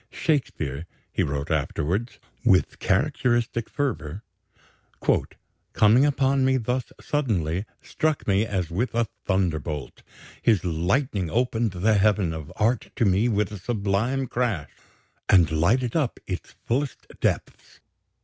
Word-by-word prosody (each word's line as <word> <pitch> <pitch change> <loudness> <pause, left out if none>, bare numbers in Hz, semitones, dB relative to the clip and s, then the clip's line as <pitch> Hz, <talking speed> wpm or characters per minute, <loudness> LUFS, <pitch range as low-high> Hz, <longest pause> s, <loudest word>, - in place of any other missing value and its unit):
"Shakespeare," 85 - -1 0.2
he - - 0
wrote 70 +2 -2
afterwards, 85 - -1 0.3
with - - +3
characteristic 120 -1 +1
fervor, 100 - -3 1.5
"coming 115 +6 +5
upon 135 -1 +2
me 130 0 +3
thus 125 +1 -2
suddenly, 100 - -1 0.2
struck 155 -1 -1
me 100 +1 +3
as 95 -6 -2
with 110 +6 -1
a 120 0 +3 0.2
thunderbolt. 80 -6 -1 0.4
His 105 -6 +3
lightning 90 - 0
opened 115 +1 0
the 100 +3 +2
heaven 100 -4 +2
of 80 -2 -7
art 115 +2 +1
to 115 - +2
me 100 +5 +3
with 105 -2 0
a 105 - -6
sublime 110 +5 0
crash, 115 - -1 0.6
and 90 -5 +5
lighted 110 +10 +2
up 145 -7 0
its 90 -2 -6
fullest 135 +4 -1
depths. - - -2
105 Hz, 120 wpm, -25 LUFS, 85-125 Hz, 1.5 s, coming